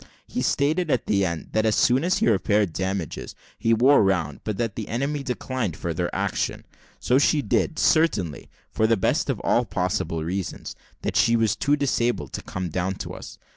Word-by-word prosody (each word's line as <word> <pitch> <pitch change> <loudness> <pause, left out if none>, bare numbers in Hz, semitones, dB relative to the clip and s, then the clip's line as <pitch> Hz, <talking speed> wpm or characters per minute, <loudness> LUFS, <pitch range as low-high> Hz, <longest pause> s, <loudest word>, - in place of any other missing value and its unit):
He - - -3
stated, 155 +4 +1
at 130 - +1
the 100 -2 +2
end, 85 -4 -3
that 110 - +1
as 110 -1 +2
soon 125 +4 +3
as 185 +2 +2
he - - +1
repaired 105 -3 +2
damages, 95 -2 -3 0.2
he 115 - +1
wore 125 +5 +5
round, 90 -7 0
but 105 -3 -3
that 115 -2 -1
the 110 - -5
enemy 140 +5 -2
declined 125 - -3
further 85 +1 -2
action. - - -2 0.3
So 125 +2 +3
she 145 0 +3
did, 155 - 0
certainly 105 - +1 0.2
for 110 +11 +2
the 115 0 +3
best 95 - 0
of - - -1
all - - +2
possible 90 -3 -2
reasons, 90 +2 -4 0.3
that - - -2
she 115 - +4
was 110 -2 +2
too 145 +7 +2
disabled 120 - -1
to - - -4
come 90 -1 -5
down 95 +3 -2
to - - -7
us. - - -10
110 Hz, 190 wpm, -24 LUFS, 90-130 Hz, 0.3 s, wore